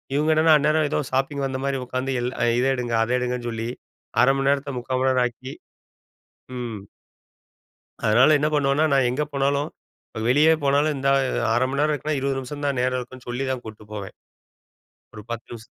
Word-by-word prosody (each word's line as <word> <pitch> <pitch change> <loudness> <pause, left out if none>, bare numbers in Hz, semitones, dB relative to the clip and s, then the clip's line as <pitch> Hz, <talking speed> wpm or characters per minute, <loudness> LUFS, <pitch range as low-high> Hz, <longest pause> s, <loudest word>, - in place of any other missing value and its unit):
இவுங்க 150 +2 +2
என்னன்னா, 160 0 +5
அந்நேரம் 155 +1 +2
ஏதோ - - +1
ஷாப்பிங் 135 +1 0
வந்தமாரி 135 +1 -2
உட்காந்து 130 +2 -2
எல் 125 +1 -2 0.3
இத 125 - +1
எடுங்க 120 -2 -2
அதை 120 +2 -1
எடுங்கன்னு 125 -1 -2
சொல்லி, 115 0 -4 0.5
1/2 135 +2 +5
மணி 135 0 +1
நேரத்த 140 0 -1
3/4 130 +1 -2
மணி 130 0 +3
நேரம் 125 -1 +2
ஆக்கி 130 +3 -9 1.1
ம். 120 -3 -5 1.3
அதனால 125 +8 +5
என்ன 150 - +1
பண்ணுவன்னா, 145 +1 +2
நான் 135 -2 +3
எங்க 130 +5 -1
போனாலும் 140 +2 0 0.6
வெளியே 150 +5 +5
போனாலும் 145 +2 +2
இந்த 135 0 -2
அ - - +2 0.3
1/2 120 - +2
மணி 140 +1 -2
நேரம் 150 0 +2
இருக்குன்னா, 150 +1 -2
20 135 0 -1
நிமிஷம் 145 +3 -6
தான் 140 -3 -1
நேரம் 130 0 0
இருக்குன்னு 125 0 -10
சொல்லி 125 +3 -2
தான் 130 -2 -4
கூட்டு 110 -1 -10
போவேன். 100 -2 -7 1.0
ஒரு 105 - -9
10 120 0 -5
நிமிஷ் 115 -1 -9
135 Hz, 180 wpm, -23 LUFS, 125-140 Hz, 1.3 s, என்னன்னா